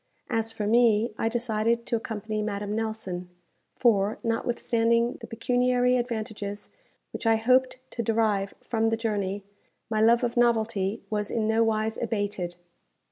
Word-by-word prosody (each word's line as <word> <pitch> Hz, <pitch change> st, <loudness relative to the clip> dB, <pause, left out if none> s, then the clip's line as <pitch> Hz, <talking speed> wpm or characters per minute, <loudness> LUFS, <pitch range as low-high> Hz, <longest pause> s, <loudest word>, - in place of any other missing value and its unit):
As 225 Hz, 0 st, 0 dB
for 215 Hz, -2 st, -4 dB
me, 230 Hz, 0 st, +3 dB
I 225 Hz, -, +1 dB
decided 235 Hz, 0 st, 0 dB
to -, -, 0 dB
accompany 215 Hz, -1 st, -3 dB
Madame 205 Hz, 0 st, -3 dB
Nelson; 220 Hz, -5 st, -4 dB, 0.5 s
for, 210 Hz, -3 st, +2 dB
notwithstanding 230 Hz, 0 st, +1 dB
the -, -, -7 dB
pecuniary 250 Hz, +2 st, +2 dB
advantages 220 Hz, -4 st, -4 dB, 0.4 s
which -, -, -3 dB
I 225 Hz, -, +5 dB
hoped 255 Hz, +3 st, +3 dB
to 235 Hz, -, -3 dB
derive 215 Hz, -3 st, +1 dB
from 225 Hz, -1 st, +1 dB
the 225 Hz, -, 0 dB
journey, 205 Hz, -3 st, -2 dB, 0.5 s
my 215 Hz, -1 st, +1 dB
love 235 Hz, +2 st, +5 dB
of 235 Hz, -1 st, -1 dB
novelty 225 Hz, -3 st, +1 dB
was 210 Hz, -1 st, -1 dB
in 220 Hz, -2 st, 0 dB
nowise 220 Hz, 0 st, +1 dB
abated. 205 Hz, -6 st, -2 dB
225 Hz, 135 wpm, -27 LUFS, 210-235 Hz, 0.5 s, I